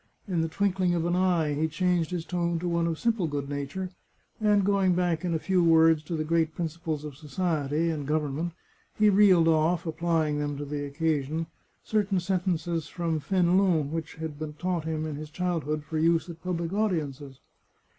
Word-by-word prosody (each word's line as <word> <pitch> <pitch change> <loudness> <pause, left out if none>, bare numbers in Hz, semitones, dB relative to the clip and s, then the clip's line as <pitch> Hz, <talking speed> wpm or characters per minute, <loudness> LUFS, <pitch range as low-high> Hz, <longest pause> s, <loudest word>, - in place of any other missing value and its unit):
In 175 -4 0
the 165 - 0
twinkling 185 +1 +1
of 165 -1 0
an 175 +1 +1
eye 175 -5 +2
he 155 +2 0
changed 175 0 0
his 175 -3 -3
tone 170 -1 -1
to 175 +2 -3
one 170 -1 +1
of 165 -1 -1
simple 225 -5 +1
good 145 -2 -3
nature, 145 +6 -4 0.5
and 210 -2 +3
going 195 -3 +3
back, 175 -2 0
in 175 -2 0
a - - +3
few 180 +2 +1
words, 160 -1 +5
to 165 - -3
the 155 - -1
great 160 0 +1
principles 160 -2 -3
of 150 -3 -7
society 155 0 -1
and 145 -3 -4
govern 150 -2 0
ment, 170 +3 -3 0.4
he 215 -1 +5
reeled 190 -4 +6
oflf, 165 +2 +2
applying 160 -2 0
them 145 -1 -2
to 145 - -4
the 145 0 -4
occasion, 155 +1 -1 0.4
certain 205 -3 +1
sentences 175 -3 -1
from 165 -2 -2
Fenelon 175 -2 +2
which 160 -1 -4
had 160 -2 -6
been 155 -1 -5
taught 175 0 -2
him 155 -1 -2
in 155 -2 -4
his 155 0 -7
childhood 155 -3 -2
for 155 +1 -3
use 165 +1 +2
at 165 -1 -13
public 170 -1 -3
audiences. 150 -10 -2
165 Hz, 190 wpm, -27 LUFS, 155-180 Hz, 0.5 s, reeled